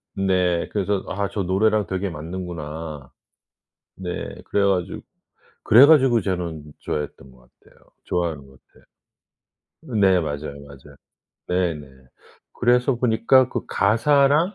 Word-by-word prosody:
네 90 -3 +1
그래서 100 -1 -1
'아 100 +1 -2
저 100 - -3
노래랑 105 +3 +1
되게 95 +1 -2
맞는구나.' 80 -4 -7 0.9
네. 90 -2 -5
그래 100 - 0
가지고, 95 -3 -1 0.6
그래 120 +6 +8
가지고 135 -6 +5
저는 90 -5 -3 0.2
좋아했던 75 -3 -5
것 65 -1 -22
같아요. - - -24 0.3
좋아하는 85 -5 -2
것 65 -1 -20
같아요. - - -25 1.2
네. 95 -2 +4
맞아요, 75 -2 -5
맞아요. 70 0 -15 0.5
네네. 85 -5 -1 0.7
그래서 125 +1 +2
보니까 125 +2 +3
그 - - -4
가사랑, 140 - +2
95 Hz, 260 characters per minute, -22 LUFS, 80-110 Hz, 1.2 s, 그래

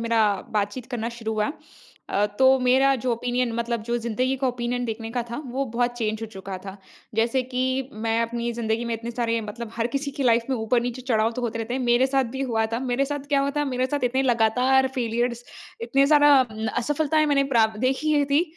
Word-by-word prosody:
मेरा 230 -1 +1 0.4
बातचीत 205 +4 -3
करना 235 -2 -2
शुरू 220 -1 -3
हुआ 215 +4 0 0.6
अ, 205 +1 +1
तो 265 0 +6
मेरा 265 +2 +4
जो 250 -2 +1
ओपिनियन 245 +1 -1
मतलब 235 -1 -2
जो 235 +2 -1
ज़िंदगी 250 +3 -1
का 265 0 -1
ओपिनियन 245 0 -2
देखने 225 -1 -4
का 245 0 -1
था, 235 - -4
वो 265 +3 -2
बहुत 240 0 0
चेंज 220 -1 -1
हो 225 - -3
चुका 195 -2 -7
था। 195 +1 -9 0.4
जैसे 230 +4 +1
कि, 260 +1 -1
मैं 225 +1 -1
अपनी 235 +1 -2
ज़िंदगी 230 0 -1
में 235 - -3
इतने 230 +1 -5
सारे 230 -1 -1
मतलब 220 +2 -7
हर 230 0 +1
किसी 280 +3 -3
की 275 0 -4
लाइफ 235 -1 +4
में 260 - +1
ऊपर-नीचे 240 +2 -1
चढ़ाव 225 -3 +1
तो 250 - -5
होते 230 -1 -2
रहते 225 +2 -3
हैं, 265 - -1
मेरे 245 +1 +3
साथ 270 0 +1
भी 265 - -3
हुआ 225 -1 +1
था, 230 - 0
मेरे 260 +1 0
साथ 285 0 -5
क्या 280 -2 +3
हुआ 280 0 0
था? 295 - +2
मेरे 255 -2 0
साथ 285 -1 -2
इतने 260 +2 +1
लगातार 250 +2 +3
फेलियर्स, 240 0 -1 0.4
इतने 275 +4 +3
ज़्यादा 290 0 +6 0.5
असफलताएँ 305 +4 +1
मैंने 280 -2 +3
प्राप 220 -1 +3
देखी 290 +2 +2
थी, 285 +4 +4
245 Hz, 215 wpm, -24 LUFS, 230-265 Hz, 0.6 s, तो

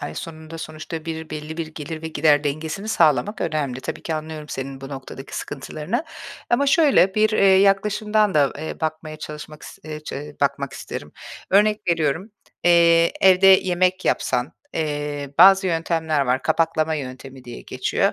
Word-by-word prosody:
ay - - -6
sonunda 160 0 -8
sonuçta 155 0 -7
bir 160 -1 -6
belli 155 +1 -6
bir 165 - -3
gelir 155 0 -7
ve 160 - -4
gider 150 -1 +3
dengesini 155 +8 -3
sağlamak 175 +3 +2
önemli. 140 -5 -2
Tabii - - -6
ki, 160 - -3
anlıyorum 155 -1 -6
senin 135 0 -6
bu 135 - -8
noktadaki 135 0 -8
sıkıntılarını. 155 - -4 0.5
Ama 260 +4 +2
şöyle, 275 - +4
bir, 215 0 +3
eee, 215 - +2
yaklaşımdan 200 +2 +3
da, 145 -2 +3
eee, 155 +1 -6
bakmaya 155 -1 -4
çalışmak 150 0 -9
is - - -11
eee, 155 -1 -6
çe 150 -1 -8
bakmak 140 -1 0
isterim. - - -8 0.4
Örnek 210 +2 +4
veriyorum, 165 +4 0 0.3
eee, 170 -1 +5
evde 190 0 +6
yemek 185 -1 +4
yapsan, 125 +5 0 0.2
eee, 145 -2 -3
bazı 190 +2 +7
yöntemler 165 -3 0
var, 130 -1 0
kapaklama 160 0 +1
yöntemi 130 -2 -8
diye 120 - -9
geçiyor. - - -1
160 Hz, 155 wpm, -22 LUFS, 150-185 Hz, 0.5 s, bazı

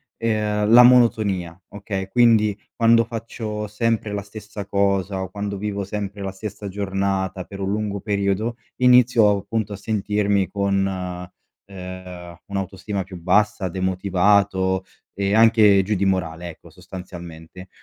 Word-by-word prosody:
ehm, 105 -2 0
la 120 +1 +9
monotonia, 105 -8 +3
okay. 100 -2 -5
Quindi, 110 -2 +3 0.2
quando 115 0 +5
faccio 110 -2 -5
sempre 110 0 -1
la 100 - -2
stessa 105 0 -9
cosa, 100 -1 0
quando 100 +1 -5
vivo 100 0 -3
sempre 100 0 -5
la 95 0 -3
stessa 105 +1 -7
giornata, 95 -1 -2
per 100 +2 -11
un 95 0 -2
lungo 105 -1 -2
periodo, 100 +3 -1 0.2
inizio, 125 -3 +5
appunto, 105 +1 -2
a - - -4
sentirmi 100 -1 0
con, 100 -1 0 0.8
ehm, 95 -1 -9 0.3
un'autostima 100 0 -4
più 90 -1 -10
bassa, 100 +2 +1
demotivato 95 +1 +1 0.3
e 100 0 -1
anche 110 -3 +6
giù 105 +3 -1
di 100 +1 0
morale, 85 -3 -1
ecco, 80 - -13
sostanzialmente. 90 -1 -11
100 Hz, 130 wpm, -22 LUFS, 95-105 Hz, 0.8 s, la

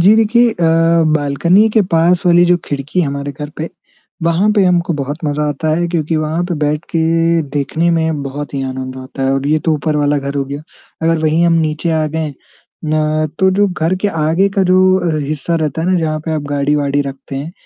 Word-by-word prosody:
जी 195 +5 +6
देखिए 235 +2 +3
अ, 220 - -7 0.6
बालकनी 170 +9 +2
के 215 0 +3
पास 170 +2 +3
वाली 175 0 +5
जो 175 0 +4
खिड़की 145 +5 -2
हमारे 140 -2 -3
घर 150 +1 -7
पे 160 +2 -4 0.5
वहाँ 170 +5 +2
पे 200 - +4
हमको 175 -1 +2
बहुत 145 +2 -4
मज़ा 150 0 -1
आता 150 +2 -3
है, 175 +1 0
क्योंकि 165 -2 -1
वहाँ 155 +2 -1
पे 175 - -1
बैठ 150 +1 -1
के 165 0 +2
देखने 150 +4 0
में 160 -3 0
बहुत 140 +1 -6
ही 135 - -2
आनंद 130 0 -5
आता 130 +1 -7
है 135 - +1
और 135 +1 -2
ये 155 +2 +2
तो 160 - +3
ऊपर 150 +1 -1
वाला 145 0 +1
घर 140 +1 -5
हो 140 - 0
गया। 140 +2 -7 0.4
अगर 165 0 +2
वहीं 160 +2 +2
हम 170 - +3
नीचे 155 +2 -1
आ 155 -1 +1
गए 155 -1 -3 0.5
ना, 155 0 0
तो 190 0 +4
जो 205 +2 +2
घर 175 0 -1
के 205 - +2
आगे 165 +3 +1
का 195 - +4
जो 185 - +5 0.4
हि 145 - -3
हिस्सा 155 +3 -2
रहता 155 0 -2
है 175 - -1
ना, 185 - +2
जहाँ 155 -1 -1
पे 160 - -2
आप 150 - -2
गाड़ी-वाड़ी 145 0 0
रखते 135 0 -7
हैं, 150 +5 -5
155 Hz, 220 wpm, -15 LUFS, 145-170 Hz, 0.6 s, जी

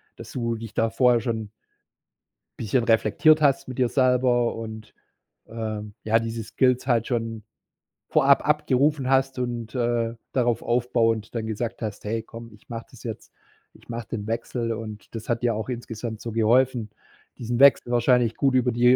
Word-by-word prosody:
dass - - -11
du 115 -2 -2
dich 115 -1 -8
da 115 0 +1
vorher 120 0 +3
schon 110 -2 -3 1.1
bisschen 115 +3 0
reflektiert 115 +8 +4
hast 135 -3 +2
mit 130 - -7
dir 125 -2 +2
selber 125 -2 +2
und, 110 -1 -8 0.5
ähm, 110 -2 -5
ja, 110 +1 +3
diese 115 0 -4
Skills 125 +4 +1
halt 115 -2 +2
schon 115 -3 -3 0.7
vorab 140 0 +4
abgerufen 145 -2 +2
hast 135 -1 +2
und, 120 -3 -4
äh, 120 -2 0 0.2
darauf 120 -3 +1
aufbauend 115 -2 0
dann 110 -1 -2
gesagt 115 +2 -4
hast: 105 -2 -5
„Hey, 110 +2 -2
komm, 115 0 -11
ich 105 - -21
mache 115 -1 -6
das 125 - -15
jetzt. 115 -3 -7 0.4
Ich - - -21
mache 115 -1 -5
den 105 -3 -4
Wechsel.“ 115 +1 -2
Und 110 -2 -8
das 110 +1 -7
hat 120 -1 0
dir 115 -2 +2
auch 110 +4 -4
insgesamt 115 -2 -5
so 115 - -5
geholfen, 115 +1 +2 0.5
diesen 120 +1 -3
Wechsel 140 -3 +6
wahrscheinlich 120 -1 +3
gut 135 -2 +1
über 125 -1 +3
die, 125 +2 +5
115 Hz, 170 wpm, -24 LUFS, 110-125 Hz, 1.1 s, Wechsel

